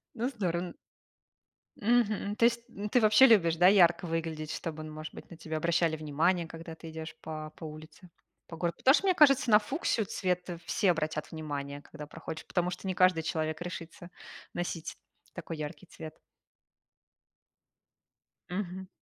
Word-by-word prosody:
Ну, 240 +3 -1
здорово, 180 -8 -2
н - - -11 1.1
Мгм. 215 -2 +2
То 230 - +4
есть 235 0 +2
н 210 -2 -5
ты 245 - +4
вообще 215 +4 +7
любишь, 180 -9 +5
да, 180 +2 +5
ярко 180 -2 +5
выглядеть, 160 -2 -3
чтобы, 155 -2 -5
ну, 155 - -8
может 155 0 -7
быть, - - -11
на 165 - -10
тебя 160 -1 -4
обращали 165 0 +1
внимание, 160 +3 +1
когда 165 0 -9
ты 165 0 -10
идешь 160 0 -7
по 155 -1 -6
по - - -12
улице, 155 +3 -11 0.4
по 165 - -9
городу. 170 -1 -2
Потому 265 - +5
что, 390 - +2
мне 370 - +4
кажется, 275 -6 +5
на 210 0 +8
фуксию 230 - -1
цвет 180 -1 -2 0.2
все 195 -5 +2
обратят 155 -2 -3
внимание, 145 -3 -5
когда 150 0 -10
проходишь, 160 +1 -8
потому 180 -1 0
что 180 +2 -6
не 185 - 0
каждый 180 -3 +4
человек 160 -1 -2
решится 175 0 -7 0.4
носить 175 -2 -4 0.4
такой 165 -2 -6
яркий 155 +4 -7
цвет. 160 -1 -9 2.4
Мгм. 185 0 -4
170 Hz, 165 wpm, -30 LUFS, 160-200 Hz, 2.4 s, на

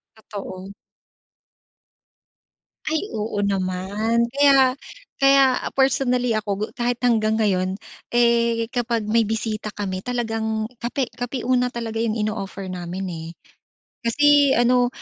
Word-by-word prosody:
Totoo. 195 -3 -8 2.1
Ay, 315 0 0 0.2
oo 210 -1 -2
naman. 200 +4 0
Kaya 270 -1 +4 0.4
kaya 275 -1 +5 0.2
personally 250 -3 +2
ako 215 -1 -5
gu 210 - 0
kahit 240 0 -1
hanggang 220 -3 +2
ngayon, 185 -3 +1 0.4
eh, 235 -1 +2
kapag 240 -2 -1
may 230 +1 +3
bisita 215 -1 -3
kami 190 -2 -4
talagang 225 -3 -2
kape 245 +2 -2
kape 245 +1 -4
una 250 0 +1
talaga 230 -2 -4
yung 225 -1 0
ino-offer 210 -3 -4
namin, 180 +1 -5
eh. 165 -2 -6 0.7
Kasi 285 +3 +4
ano, 245 +1 +3
230 Hz, 110 wpm, -22 LUFS, 210-245 Hz, 2.1 s, kaya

